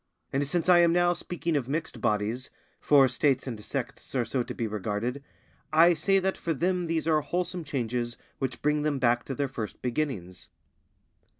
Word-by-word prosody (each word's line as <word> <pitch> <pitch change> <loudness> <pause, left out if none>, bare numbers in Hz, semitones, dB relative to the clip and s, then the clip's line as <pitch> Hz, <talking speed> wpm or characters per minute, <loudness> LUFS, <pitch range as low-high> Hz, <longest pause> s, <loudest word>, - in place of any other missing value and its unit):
And 140 +1 +1
since 170 +4 -1
I 180 -1 +7
am 170 -1 +5
now 175 0 +3
speaking 170 -2 -3
of 135 -3 -1
mixed 155 -5 -3
bodies, 110 +5 0 0.3
for 140 -2 +5
States 130 +2 +1
and 115 -5 -6
Sects 135 +2 -5
are 125 -2 +1
so 125 +3 -1
to - - -5
be 115 - -2
regarded, 110 +5 -3 0.5
I 165 +3 +6
say 195 +5 +2
that 190 0 0
for 165 -2 -1
them 180 +3 0
these 165 -1 -1
are 155 -2 +3
wholesome 175 +2 -2
changes 120 -4 -2 0.2
which 130 -2 -3
bring 150 0 +2
them 150 -1 0
back 120 -2 +2
to 135 - -4
their 140 +1 0
first 115 -5 -6
beginnings. 120 - -3
140 Hz, 185 wpm, -28 LUFS, 120-165 Hz, 0.5 s, I